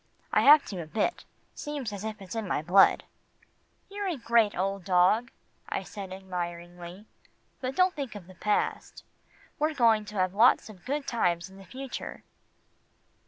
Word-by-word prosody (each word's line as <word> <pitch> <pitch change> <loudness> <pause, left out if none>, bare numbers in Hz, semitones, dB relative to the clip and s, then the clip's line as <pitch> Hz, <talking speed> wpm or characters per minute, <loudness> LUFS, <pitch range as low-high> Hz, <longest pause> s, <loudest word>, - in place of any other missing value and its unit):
I - - +5
have 295 +1 +8
to 185 -4 -5
a 160 - -8
bit, 220 - -1 0.3
seems 285 -7 -5
as 200 0 -6
if 215 -2 -5
it's 185 - -8
in 225 -3 -3
my 150 - -1
blood." 190 +4 +5 0.8
"You're 405 0 -4
a 350 -5 -2
great 230 -3 +2
old 195 +1 -1
dog," 190 +6 +3 0.4
I - - -2
said 195 -3 -8
admiringly, 175 0 -6 0.5
"but 260 0 -4
don't 365 0 +3
think 275 -7 -5
of 200 -4 -9
the 185 - -14
past. 210 +3 -2 0.6
We're 305 +1 +1
going 225 -4 +4
to 210 +1 -10
have 185 -1 +1
lots 225 +2 +4
of 190 -5 -14
good 285 +2 -2
times 180 -7 0
in 190 - -14
the 195 - -13
future." 265 +4 -7
210 Hz, 165 wpm, -28 LUFS, 185-255 Hz, 0.8 s, have